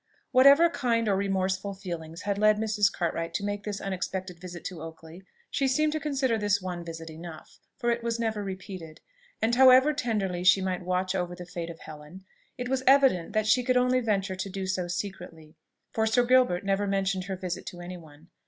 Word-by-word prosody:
Whatever 280 +6 +7
kind 235 -8 0
or 200 - +3
remorseful 195 0 -1
feelings 170 -4 -7
had 200 0 -1
led 215 0 +4
Mrs. 210 -2 +2
Cartwright 165 -1 -3
to 205 - -1
make 205 0 -3
this 205 -2 -3
unexpected 185 -1 -4
visit 175 -1 -9
to 180 -5 -6
Oakley, 160 +2 -10 0.3
she 275 - +1
seemed 305 +4 +2
to 310 - -1
consider 270 -6 0
this 205 -1 +2
one 180 -2 -5
visit 165 -1 -8
enough 160 0 -11 0.2
for 240 -3 0
it 235 0 -1
was 235 0 -2
never 220 -2 -1
repeated: 185 -4 -8 0.4
and 225 +2 +2
however 260 +3 +7
tenderly 210 -10 -2
she 195 +1 +6
might 185 -1 -2
watch 185 +1 -1
over 180 -2 -2
the 180 0 -9
fate 170 -1 -6
of 165 - -10
Helen, 155 +5 -11 0.3
it 250 -1 -4
was 265 0 0
evident 265 -11 +4
that 215 -1 +1
she 215 +4 +4
could 250 0 +2
only 250 +1 +3
venture 200 -5 -1
to 190 +1 -4
do 195 0 -4
so 185 -1 -2
secretly; 175 -4 -6 0.4
for 220 0 0
Sir 245 +2 +3
Gilbert 245 -8 +3
never 200 +1 +1
mentioned 195 -1 0
her 190 0 -3
visit 180 -1 -5
to 175 - -7
any 180 +1 -7
one. 160 0 -16
195 Hz, 200 wpm, -27 LUFS, 180-230 Hz, 0.4 s, Whatever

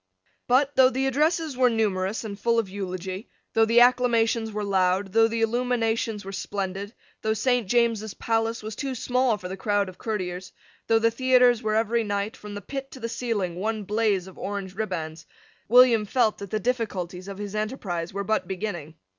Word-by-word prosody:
But, 275 +3 +3
though 260 -1 +7
the 265 +1 -1
addresses 305 +2 +1
were 250 0 +4
numerous 210 -2 0
and 205 -2 -6
full 235 +2 +2
of 225 -3 +1
eulogy, 185 +1 -5 0.2
though 225 0 +4
the 230 +2 +5
acclamations 235 -2 +3
were 210 0 -3
loud, 190 0 +1
though 225 0 +5
the 225 0 -1
illuminations 225 -3 0
were 195 - -6
splendid, 195 +1 -4 0.3
though 220 0 0
Saint 245 -1 +1
James's 225 -2 +1
Palace 225 0 -1
was 215 -1 -6
too 270 +1 -3
small 250 -1 +1
for 180 - -7
the 190 - -5
crowd 205 0 0
of 185 - -14
courtiers, 185 -4 -4 0.3
though 225 - +4
the 230 +1 +3
theatres 250 -1 +4
were 215 -2 0
every 230 +1 +1
night, 205 +2 -2
from 210 -3 -9
the 205 - -6
pit 270 +5 -6
to 265 - -11
the 230 - -3
ceiling, 220 -7 -2
one 215 +2 -2
blaze 210 -2 +1
of 190 - -13
orange 195 -2 -4
ribands, 170 -6 -4 0.4
William 240 -2 +6
felt 230 -1 +1
that 200 - -7
the 215 - -1
difficulties 190 -6 -3
of 200 -1 -7
his 205 -1 -6
enterprise 210 -6 -3
were 200 +1 -3
but 205 -2 0
beginning. 180 -5 -5
220 Hz, 190 wpm, -25 LUFS, 195-235 Hz, 0.4 s, though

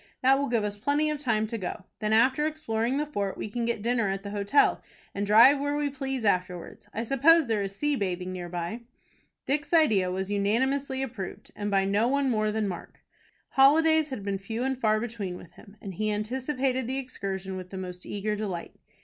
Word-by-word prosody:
That 270 +1 +5
will 280 - 0
give 235 -3 +1
us 205 0 -3
plenty 290 +7 +1
of 300 - -3
time 220 -6 +1
to 225 +1 -4
go. 185 0 -5 0.2
Then, 215 0 -1
after 255 +6 +4
exploring 255 -5 -1
the 300 - 0
fort, 200 -10 -3
we - - -4
can 235 +1 -2
get 235 -3 -2
dinner 235 -3 +1
at 195 0 -3
the 200 - -6
hotel, 205 +7 +2 0.3
and 200 0 -2
drive 235 +7 +7
where 285 +1 -1
we 290 -1 -1
please 270 -3 -3
afterwards. 180 -3 -2
I 225 - -3
suppose 295 +6 +5
there 220 -4 0
is 195 0 -4
sea 295 +5 0
bathing 185 -4 -2
near 180 -1 -6
by." 175 +6 -4 0.6
Dick's 290 +3 -1
idea 215 - +4
was 190 +2 -3
unanimously 265 +7 0
approved, 225 -8 -7
and 205 0 -3
by 195 -1 +2
no 205 +4 +2
one 275 0 +1
more 215 -2 +1
than 220 +1 -1
by 200 - -1
Mark. 175 - -9 0.5
Holidays 315 +3 +5
had 260 -7 -5
been 195 -1 -2
few 225 +5 -4
and 265 0 0
far 215 -1 +3
between 215 -6 -4
with 170 - -13
him, 200 +3 -17
and 195 - -7
he 215 +4 -1
anticipated 255 +4 -1
the 260 +1 -2
excursion 195 -7 -4
with 185 -1 -7
the 190 - -7
most 180 -1 -6
eager 210 +1 -2
delight. 195 -5 -5
220 Hz, 210 wpm, -27 LUFS, 200-270 Hz, 0.6 s, drive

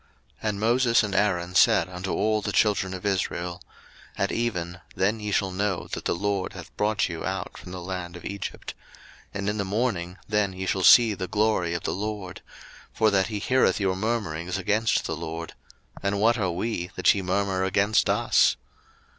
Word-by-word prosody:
02:016:006 110 - -1
And 100 -1 -3
Moses 115 +1 +3
and 105 -2 -3
Aaron 90 -3 +1
said - - +5
unto 90 +1 -5
all 110 0 +1
the - - -2
children 100 -3 +1
of 95 - -8
Israel, 90 -3 -2 0.6
At - - 0
even, 90 -7 -2
then 105 +4 +1
ye 105 0 -4
shall 95 -1 +1
know 95 0 -2
that - - -5
the - - +1
LORD 100 +1 -2
hath 90 -3 -11
brought 105 +1 +1
you 85 -2 -6
out - - -4
from 90 - -10
the 90 - -6
land 90 -1 -5
of - - -12
Egypt: 100 -1 -6 0.6
02:016:007 - - -1
And 100 0 -1
in 105 - -5
the - - +1
morning, 95 -4 -2
then 105 -2 +1
ye 95 0 -5
shall 95 +1 0
see 115 +3 +7
the 95 -2 -4
glory 105 -5 +1
of 85 - -4
the - - -1
LORD; 100 -2 -5 0.5
for 110 -1 +2
that 95 -1 +2
he 110 - -4
heareth 110 -2 +2
your 95 -2 +1
murmurings 95 -5 -2
against 105 +5 +1
the 80 - -2
LORD: 80 +1 -6 0.5
and 100 0 0
what 115 +3 +4
are 95 -3 +1
we, 90 0 -3
that - - +4
ye 100 - -2
murmur 95 0 0
against 100 +2 +2
us? - - +3
100 Hz, 195 wpm, -26 LUFS, 90-105 Hz, 0.6 s, see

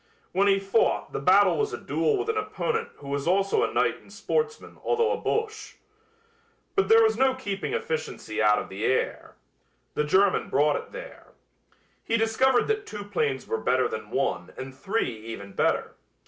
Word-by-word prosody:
When 195 +2 +2
he 195 -1 +5
fought 195 +3 +1
the - - -2
battle - - +5
was 430 0 0
a - - -2
duel 440 -2 0
with 400 +2 -3
an 445 - 0
opponent 435 +2 -2
who 140 - -13
was 140 +1 -2
also 195 +2 +2
a - - +1
knight - - +1
and - - -19
sportsman 455 -1 -3
although 465 0 +2
a 475 - 0
Boche. 440 -2 -3 1.0
But 395 - +2
there 450 0 +7
was 440 0 +2
no 265 0 +3
keeping 200 -7 -4
efficiency 155 -9 -3
out 105 -1 +5
of - - -3
the 100 +3 -6
air. 130 - -1 0.6
The 150 - 0
German 190 +6 +2
brought 145 +2 +3
it - - -6
there. - - -10 0.7
He 230 - +1
discovered 240 +3 +3
that 430 -1 -1
two 205 -1 -6
planes 150 -10 -1
were 110 - -2
better 130 +1 +2
than 110 -1 -6
one 105 -8 -1
and 130 0 -7
three 190 - -2
even 100 -3 -7
better. - - 0
200 Hz, 180 wpm, -26 LUFS, -, 1.0 s, there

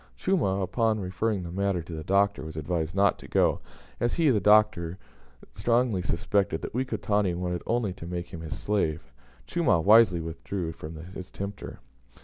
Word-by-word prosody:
Chumah, 100 - +1
upon 110 +3 +1
referring 95 +1 -1
the 85 - -6
matter 95 -2 -1
to 85 - -9
the 80 -1 -5
Doctor, 100 +4 +2
was 80 0 -8
advised 80 +2 -2
not 100 0 +3
to - - -11
go, - - +2 0.4
as 120 - 0
he 160 -5 +4
(the 110 - +3
Doctor) 95 -5 +3 0.6
strongly 115 -1 +1
suspected 85 0 0
that - - -5
Wekotani 105 -7 0
wanted 90 0 -2
only 115 -5 0
to 85 -2 -9
make 90 0 -4
him 85 -3 -8
his 75 -3 -5
slave. 80 -9 -1 0.3
Chumah 170 - +2
wisely 105 -3 +6
withdrew 80 +2 -4
from 80 0 -9 0.2
his 95 -1 -8
tempter. 100 +1 -7
95 Hz, 165 wpm, -27 LUFS, 85-105 Hz, 0.6 s, wisely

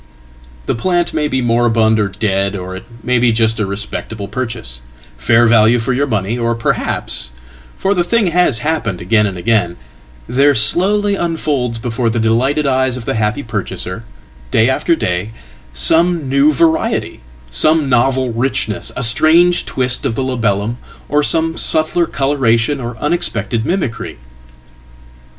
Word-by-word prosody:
The - - -1
plant 175 +7 -1
may 150 -1 0
be 130 -2 -1
moribund 115 -2 +2
or 105 - +1
dead, 100 -1 -1
or 95 -1 -6
it 95 - -9 0.2
may 125 -1 +1
be 120 0 +3
just 110 0 +1
arespectable 100 +1 -4
purchase, 110 - -5 0.3
fair 115 - +3
value 115 0 +4
for 120 +2 -1
your 140 +3 0
money, 110 0 -2
or 115 0 0
perhaps 115 - -2 0.5
for 195 - 0
the 180 -3 +1
thinghas 175 - +1
happened 135 - -2
again 105 +3 +1
and 95 -2 -6
again 90 -3 0 0.5
there 140 +3 +3
slowly 200 - +2
unfolds 150 -9 -2
before 115 0 -2
the 115 - -2
delightedeyes 130 +3 +1
of 120 - -8
the - - -1
happy 110 +4 -1
purchaser, 110 -2 -4 0.5
day 110 - +3
after 130 +6 +1
day, 95 - -3 0.4
some 160 - +1
new 140 +3 +3
variety, 160 +2 0 0.3
some 155 - +3
novelrichness, 125 -2 0
a 125 - -3
strange 165 +9 +4
twist 125 0 0
of 130 -5 -2
the 135 - -2
labellum, 115 -3 -1 0.3
or 145 +1 +2
some 160 +2 +3
subtler 160 +2 +2
colouration 135 -1 0
orunexpected 120 -1 -1
mimicry. 170 -11 -3
120 Hz, 135 wpm, -15 LUFS, 110-145 Hz, 0.5 s, value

